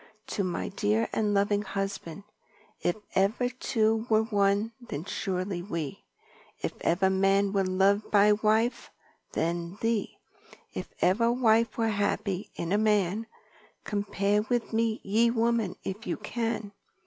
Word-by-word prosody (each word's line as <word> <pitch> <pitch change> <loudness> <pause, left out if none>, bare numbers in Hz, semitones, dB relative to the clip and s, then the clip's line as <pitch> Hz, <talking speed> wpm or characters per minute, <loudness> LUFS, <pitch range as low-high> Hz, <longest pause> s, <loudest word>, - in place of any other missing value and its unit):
"To 200 - -1
my 180 -2 -2
dear 210 +3 +1
and 210 -2 +1
loving 205 0 +2
Husband: 195 -2 -4 0.6
If 175 - +1 0.2
ever 215 +6 +2
two 225 -3 0
were 220 0 +4
one 205 0 +1
then 160 -9 -6
surely 185 -2 -2
we, 165 -6 -4 0.6
If - - -3
ever 190 +3 +2
man 195 +1 +2
were 195 -1 +2
loved 195 +3 +2
by 205 0 +5
wife, 220 +3 +1 0.4
then 170 +2 -2
thee; 225 -2 -1 0.6
If - - -5
ever 230 +6 +3
wife 230 -2 +3
was 225 -1 +1
happy 200 -1 -1
in 170 - -4
a 205 - +3
man, 210 0 +1 0.6
Compare 205 0 0
with 240 -2 -1
me 225 0 +1
ye 225 +4 +3
women 230 -3 +1
if 200 +4 -5
you - - -1
can. 225 -1 -3
205 Hz, 135 wpm, -28 LUFS, 195-225 Hz, 0.6 s, by